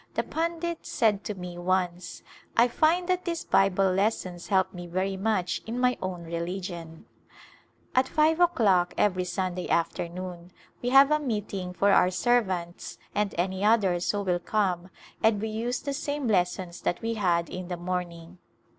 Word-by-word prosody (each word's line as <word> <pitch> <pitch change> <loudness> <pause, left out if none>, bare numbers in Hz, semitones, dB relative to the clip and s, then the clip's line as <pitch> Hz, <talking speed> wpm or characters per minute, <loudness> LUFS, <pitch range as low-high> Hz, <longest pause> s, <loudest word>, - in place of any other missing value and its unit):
The - - +1
pundit 335 +1 -3
said 210 -3 +1
to 210 - -3
me 180 -1 -7
once, 180 -1 -1 0.2
" - - -29
I 235 +1 +6
find 330 +8 +2
that 365 -1 +1
these 335 -2 -3
Bible 195 0 +3
lessons 185 -3 -1
help 190 -2 +2
me 175 -1 -7
very 190 +3 -1
much 190 -2 -1
in 235 +2 -3
my 250 0 +3
own 185 -2 -4
religion! 170 -1 -5 0.4
" - - -31
At 255 0 +4
five 315 +3 +2
o'clock 205 - +3
every 185 -3 +2
Sunday 180 -1 -3
afternoon 175 +1 -2 0.3
we 245 - -1
have 275 +2 +7
a 305 - +4
meeting 210 -8 -3
for 200 +2 +2
our 180 - +5
servants 185 -3 -1 0.2
and 210 -1 -1
any 190 +2 -1
others 195 -5 +3
who 205 -1 0
will 180 -2 0
come 185 -3 -1 0.3
and 220 -2 +3
we 220 +2 -2
use 235 +3 -2
the 280 - -4
same 285 -1 -3
lessons 180 -3 0
that 175 - -2
we 230 0 0
had 175 -6 +1
in 185 -1 -6
the 180 -1 -4
morn 180 0 -2
ing. 170 +2 -13
190 Hz, 170 wpm, -27 LUFS, 180-230 Hz, 0.4 s, have